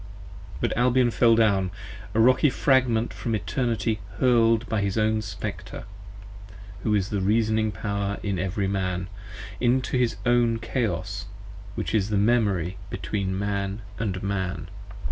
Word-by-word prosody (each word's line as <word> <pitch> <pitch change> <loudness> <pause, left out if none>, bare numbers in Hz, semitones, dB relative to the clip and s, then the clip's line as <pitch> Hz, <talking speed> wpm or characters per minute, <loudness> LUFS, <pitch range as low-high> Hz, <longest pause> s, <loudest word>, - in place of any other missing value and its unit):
But - - 0
Albion 125 0 +3
fell 115 0 +4
down, 100 -4 +3 0.5
a - - +3
Rocky 130 +5 +5
fragment 125 -4 +2
from 115 -2 -2
Eternity 115 -1 -1 0.2
hurl'd 115 -1 +3
By 110 -2 0
his 100 0 -1
own 110 0 +2
Spectre, 105 -4 -6 1.0
who 105 +1 +1
is 100 0 0
the 100 -2 0
Reasoning 110 +2 +2
Power 100 +1 -2
in 100 -4 -1
every 95 +2 -1
Man, 95 -1 -2 0.5
Into 125 +1 +1
his 120 -2 +1
own 120 -1 +3
Chaos 100 -6 -2 0.5
which - - -3
is 105 -2 +1
the 105 - +1
Memory 100 -5 +2
between 95 -3 -2
Man 100 +1 -2 0.2
& 95 -4 -2
Man. 95 -2 -2
110 Hz, 135 wpm, -25 LUFS, 100-115 Hz, 1.0 s, Rocky